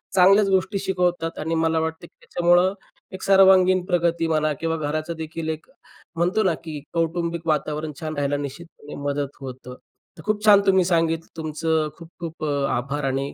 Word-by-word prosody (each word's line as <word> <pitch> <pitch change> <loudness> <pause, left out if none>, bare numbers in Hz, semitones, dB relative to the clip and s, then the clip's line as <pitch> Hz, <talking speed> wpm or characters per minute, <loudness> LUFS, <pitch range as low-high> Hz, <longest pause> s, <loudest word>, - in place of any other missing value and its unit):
चांगल्याच 195 +2 +6
गोष्टी 190 +1 +1
शिकवतात 180 -3 -1
आणि 160 +2 -2
मला 160 0 +2
वाटतं 160 +1 -3
की - - -33
त्याच्यामुळं 175 +2 +3 0.4
एक 190 - -7
सर्वांगीण 190 -1 +6
प्रगती 170 -2 +1
म्हणा 155 -1 +1
किंवा 165 0 -1
घराचंदेखील 155 +1 -4
एक 160 0 -5 0.5
म्हणतो 180 +6 +1
ना 185 -4 +2
की 155 -3 -6
कौटुंबिक 170 0 -1
वातावरण 155 0 -1
छान 155 -1 -4
राहायला 145 0 0
निश्चितपणे 145 +1 -8
मदत 140 -1 -3
होतं. 125 -1 -8 0.4
तर 160 - -11
खूप 215 0 -1
छान 205 -2 +7
तुम्ही 190 -2 +4
सांगितलं. 165 -2 0
तुमचं 155 0 -1
खूप, 165 -1 -12
खूप 165 -2 -5
अ, 145 - 0 0.2
आभार 140 +4 -3
आणि 135 +1 -2
165 Hz, 160 wpm, -23 LUFS, 155-180 Hz, 0.5 s, छान